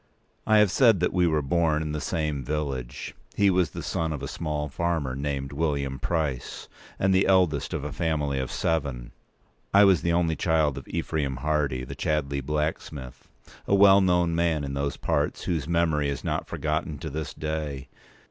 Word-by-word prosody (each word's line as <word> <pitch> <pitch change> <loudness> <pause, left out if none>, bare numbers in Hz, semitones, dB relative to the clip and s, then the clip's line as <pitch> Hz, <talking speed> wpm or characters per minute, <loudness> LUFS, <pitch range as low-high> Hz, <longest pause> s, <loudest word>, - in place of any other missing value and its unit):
I 110 - +5
have 105 -3 +5
said 115 -5 +5
that 90 - 0
we 90 -1 +3
were 80 -2 +1
born 80 +1 +1
in 75 - -3
the 75 0 -3
same 75 -2 -2
village. 70 -4 -4 0.2
He 100 -1 +4
was 90 -2 +2
the - - -7
son 80 -1 -1
of 75 -3 -5
a - - -3
small 75 -1 -3
farmer, 80 -3 -1
named 70 0 -3
William 70 -3 -1
Price, 75 -7 -2 0.3
and 95 0 +2
the 95 +1 +3
eldest 90 -7 +2
of - - -3
a 75 - -4
family 75 -5 -1
of 65 - -3
seven; 70 -7 -2 0.6
I 100 - +8
was 95 -4 +5
the 85 - 0
only 85 -1 +2
child 80 -5 +1
of 65 - -15
Ephraim 70 -4 -2
Hardy, 70 -1 -1
the 65 +2 -7
Chadleigh 70 0 -1
blacksmith—a 75 +2 -4
well 100 0 +7
known 90 -2 +2
man 80 -3 +1
in 70 -1 -4
those 70 0 -2
parts, - - -1
whose 80 -5 -2
memory 80 -4 +1
is 70 - -4
not - - -2
forgotten 75 0 -2
to 80 +3 -6
this 75 +1 -5
day. 75 -4 -4
75 Hz, 180 wpm, -26 LUFS, 70-85 Hz, 0.6 s, I